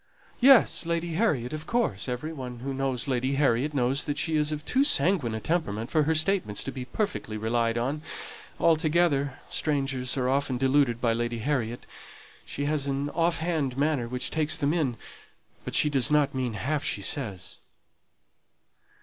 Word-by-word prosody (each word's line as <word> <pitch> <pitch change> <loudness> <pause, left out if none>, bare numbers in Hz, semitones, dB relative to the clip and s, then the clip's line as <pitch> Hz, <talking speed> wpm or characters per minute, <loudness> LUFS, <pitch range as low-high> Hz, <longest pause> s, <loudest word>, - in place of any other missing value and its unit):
"Yes 250 -9 +5
Lady 170 0 -1
Harriet 155 - 0
of 155 0 -6
course 185 - 0
every 125 +6 -4
one 125 -4 -7
who 135 +1 -3
knows 135 -1 -1
Lady 130 +1 0
Harriet 140 +1 +1
knows 135 +2 +1
that 145 -1 -2
she 160 -2 0
is 150 0 +1
of 150 0 -4
too 265 +2 +3
sanguine 175 - +1
a - - -3
temperament 115 -7 -2
for 155 - +3
her 160 +1 +1
statements 155 - +2
to 135 - -4
be 130 -2 -6
perfectly 130 - -3
relied 115 +1 0
on. 135 +6 -1 0.6
Altogether 155 -4 +2
strangers 135 -4 0
are 125 -1 0
often 135 -1 0
deluded 130 -2 +2
by 115 -2 +2
Lady 120 0 -2
Harriet 120 -2 -2 0.6
she 145 - -4
has 145 -1 0
an 140 +1 -2
off 170 0 +1
hand 155 -6 -1
manner 140 -4 +1
which 125 +1 -2
takes 155 -1 +1
them 145 +2 +1
in; 140 -9 0 0.7
but - - -5
she - - +4
does 135 -5 +2
not 150 -2 +3
mean 130 -3 -2
half 140 +8 -2
she 100 - -2
says." 95 -8 -2
140 Hz, 170 wpm, -27 LUFS, 125-155 Hz, 0.7 s, Yes